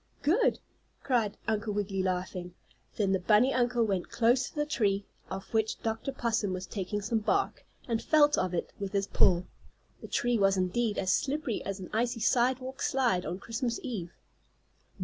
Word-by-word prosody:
"Good!" 400 +12 +3 0.5
cried 230 -6 +1
Uncle 215 -1 0
Wiggily, 200 -2 -1
laughing. 180 -1 -3 0.4
Then 200 -3 +1
the 190 - +2
bunny 215 +8 +4
uncle 245 -1 +2
went 190 -4 -1
close 245 +2 +2
to - - -23
the 295 0 0
tree, 205 -9 0 0.2
off 190 +3 -7
which 220 -1 +1
Dr. 225 +4 -2
Possum 230 -6 -1
was 185 0 -4
taking 205 +1 -4
some 225 +2 +1
bark, 395 - 0 0.2
and 230 -2 0
felt 295 -1 +5
of 185 - 0
it 170 - -3
with 200 0 -4
his 200 -1 +1
paw. 180 -2 +3 0.6
The - - -8
tree 240 -2 +1
was 195 -1 +3
indeed 205 +4 0
as 190 0 +2
slippery 280 -4 -1
as 195 0 -3
an 185 - -8
icy 235 +2 0
sidewalk 255 +3 +1
slide 240 -9 +1
on 175 - -3
Christmas 230 +3 -3
eve. 205 -10 -4
220 Hz, 170 wpm, -30 LUFS, 195-245 Hz, 0.6 s, felt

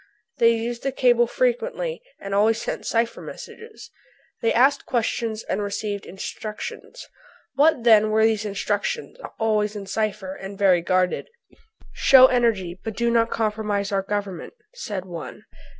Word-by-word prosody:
They 230 0 +5
used 235 +1 -4
the 275 - -1
cable 240 -2 +3
frequently - - -1 0.2
and 195 - -6
always 215 +3 +3
sent - - -4
cipher 230 0 0
messages. 450 -1 -11 0.5
They 230 - +2
asked 270 +4 +3
questions 225 -2 -1
and 210 - -2
received 205 0 -4
instructions. 215 - -7 0.5
What, 280 -2 +3
then, 215 -2 +6
were 220 +1 +3
these 220 -1 +1
instructions, 210 - -3 0.2
always 215 -1 0
in 200 -1 -6
cipher 205 -1 -2
and 195 +1 -9
very 185 -3 +4
guarded? 185 - 0 0.6
"Show 260 -1 +7
energy, 220 -9 +1
but 220 -2 -5
do 235 0 +1
not 230 0 +3
compromise 210 -2 -1
our 195 -1 +1
Government," 195 -3 -4 0.2
said 205 - -5
one. 170 -3 -8
220 Hz, 140 wpm, -23 LUFS, 200-240 Hz, 0.6 s, Show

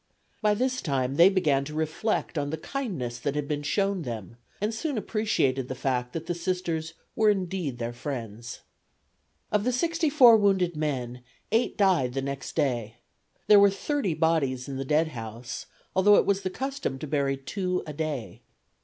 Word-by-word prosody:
By 210 -1 +3
this 255 +3 0
time 135 -3 -1
they 175 +3 +8
began 150 -8 +2
to 150 +1 -7
reflect 160 +7 -1
on 145 -2 -1
the 160 - -3
kindness 165 - -4
that 140 +2 -2
had 150 -1 -2
been 145 -1 -2
shown 195 +5 0
them 115 - -6 0.2
and 210 +2 -1
soon 280 +3 -2
appreciated 205 - 0
the 130 - -4
fact 125 -1 -1
that 165 0 -4
the 175 - -1
Sisters 170 -2 -2 0.2
were 220 -1 +4
indeed 185 -9 -1
their 120 0 -4
friends. 120 -3 -6 0.9
Of 210 -1 +2
the 250 - +1
sixty 330 +5 +1
four 250 -6 +8
wounded 190 -5 +2
men 125 -5 -3 0.3
eight 230 +3 +1
died 180 -11 +3
the 135 - 0
next 140 -1 -5
day. 120 -7 0 0.5
There 210 -1 +8
were 200 0 +7
thirty 200 - -1
bodies 155 -6 +1
in 135 -1 -5
the 135 - -3
dead 155 +3 +2
house, 120 0 -7 0.3
although 200 +2 +6
it - - +4
was 200 0 +1
the 185 - -2
custom 270 - -3
to 135 - -6
bury 140 -2 0
two 180 +6 -2
a 150 - -6
day. 150 -6 -4
160 Hz, 180 wpm, -27 LUFS, 135-200 Hz, 0.9 s, they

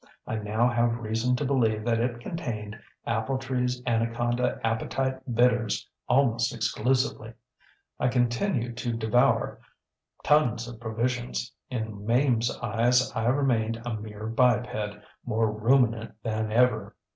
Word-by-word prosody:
I 110 - -3
now 110 +3 +1
have 120 -1 +1
reason 115 +2 0
to 145 - -2
believe 115 -5 +1
that 115 -1 +2
it 120 0 -1
contained 115 -9 -5 0.3
AppletreeŌĆÖs 125 +1 -1
Anaconda 120 +1 0
Appetite 130 +4 -1
Bitters 120 -3 +2 0.2
almost 120 -3 +2
exclusively. 125 -3 0 0.7
I 125 - +2
continued 120 - 0
to 120 -1 -2
devour 115 +2 +2 0.6
tons 120 -6 +3
of 120 -2 -9
provisions. 120 +2 -2 0.2
In 110 -4 -4
MameŌĆÖs 120 +3 +1
eyes 120 +3 +2
I 110 0 0
remained 120 -4 +1
a 120 - -2
mere 105 0 -6
biped, 110 -3 0 0.2
more 110 -2 +1
ruminant 115 0 +2
than 110 -1 -2
ever. 125 +3 +2
120 Hz, 120 wpm, -27 LUFS, 110-125 Hz, 0.7 s, tons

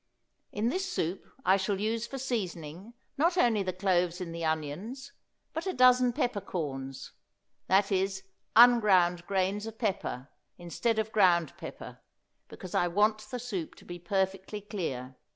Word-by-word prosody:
In 220 +3 0
this 375 +6 -2
soup 185 - -2 0.2
I 190 +1 +5
shall 195 0 -1
use 225 +2 -1
for 270 - -6
seasoning 195 - -4 0.2
not 340 +4 +3
only 235 - +3
the 185 -1 -1
cloves 180 -1 +1
in 180 -2 -5
the 165 0 -5
onions, 165 - -3 0.4
but 325 +4 -4
a 375 - -1
dozen 250 0 +5
peppercorns 150 - -3 0.6
that 195 +2 +3
is, 190 0 0 0.3
unground 195 -8 +6
grains 195 +2 0
of 225 0 -8
pepper, 195 - -3 0.3
instead 185 +7 -1
of 220 0 -1
ground 175 -7 +3
pepper, - - -9 0.5
because 185 - -10
I 175 - +2
want 210 +5 +2
the 250 - -4
soup 215 -9 -5
to - - -17
be 175 0 -8
perfectly 190 +2 -2
clear. 135 - -5
195 Hz, 150 wpm, -29 LUFS, 175-230 Hz, 0.6 s, unground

